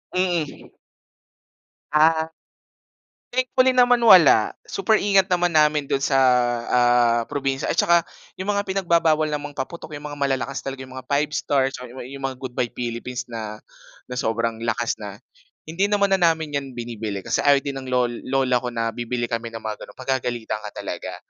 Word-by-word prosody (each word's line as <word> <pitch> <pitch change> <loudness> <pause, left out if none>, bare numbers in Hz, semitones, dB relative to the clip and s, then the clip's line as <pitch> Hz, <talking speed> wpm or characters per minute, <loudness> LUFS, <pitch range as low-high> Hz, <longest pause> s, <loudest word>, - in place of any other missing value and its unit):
Mm. 175 -5 -1 1.2
Ah. 160 +1 +3 1.0
Thankfully 255 +1 +3
naman 245 -1 +4
wala. 175 - +7 0.2
Super 215 +3 +1
ingat 195 -2 +3
naman 175 -2 +1
namin 150 -2 +3
do'n 135 0 -1
sa 135 -1 +3 0.5
ah, 120 -1 +3
probinsya 135 -2 -1
at - - -1
tsaka 170 -1 +4 0.3
'yung 190 +3 -2
mga 200 0 -1
pinagbabawal 170 -5 +2
namang 145 -1 -4
paputok 155 +2 -6
'yung 145 - -9
mga 145 -1 -7
malalakas 135 0 -1
talaga 135 -1 -6
'yung 130 - -12
mga - - -14
Five 145 +1 +1
Stars, 135 -2 0
or 125 - -8 0.2
yu 135 +3 -9
'yung 135 - -2
mga 135 - -6
Goodbye 125 -1 -3
Philippines 125 +1 -4
na 110 -2 -6 0.5
na 125 - -3
sobrang 115 0 -1
lakas 115 +1 -1
na, - - -7 0.5
hindi 170 +6 -1
naman 200 -1 +1
na 195 - +3
namin 160 -3 +2
'yan 135 -2 -10
binibili. 110 -4 -5
Kasi 115 +1 -1
ayaw 140 -1 +4
din 140 -1 -4
ng 130 - -9
lol 125 -1 +1 0.2
lola 130 -2 +2
ko 125 - -5
na 115 -1 -2
bibili 120 0 -3
kami 115 0 -2
ng 115 -1 -8
mga 110 -1 -4
gano'n. - - -15
Pagagalitan 125 -4 -2
ka 105 - -8
talaga. - - -5
135 Hz, 170 wpm, -23 LUFS, 120-165 Hz, 1.2 s, wala